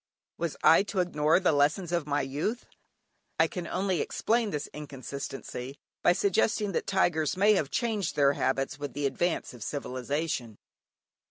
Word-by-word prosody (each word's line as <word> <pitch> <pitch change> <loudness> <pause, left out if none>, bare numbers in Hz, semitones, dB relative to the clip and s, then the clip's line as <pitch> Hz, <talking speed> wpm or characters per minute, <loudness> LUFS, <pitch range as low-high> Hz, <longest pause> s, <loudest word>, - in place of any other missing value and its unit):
Was 170 -2 -2
I 165 - +7
to 200 -1 -3
ignore 160 -2 +3
the 185 - +3
lessons 150 +5 +2
of 170 -4 0
my 145 0 +1
youth? 150 - -2 0.7
I - - +6
can 180 -3 -5
only 185 -3 0
explain 230 -1 0
this 150 -6 -3
inconsistency 140 -2 -6 0.2
by 175 - +5
suggesting 205 +2 +1
that - - -2
tigers 175 -4 +1
may 205 +3 +5
have 155 -9 0
changed 220 - -1
their 140 -1 +4
habits 135 0 -1
with 145 -3 -5
the 145 +2 -2
advance 160 +5 -1
of 120 - -12
civilization. 135 -1 -3
155 Hz, 155 wpm, -29 LUFS, 140-190 Hz, 0.7 s, I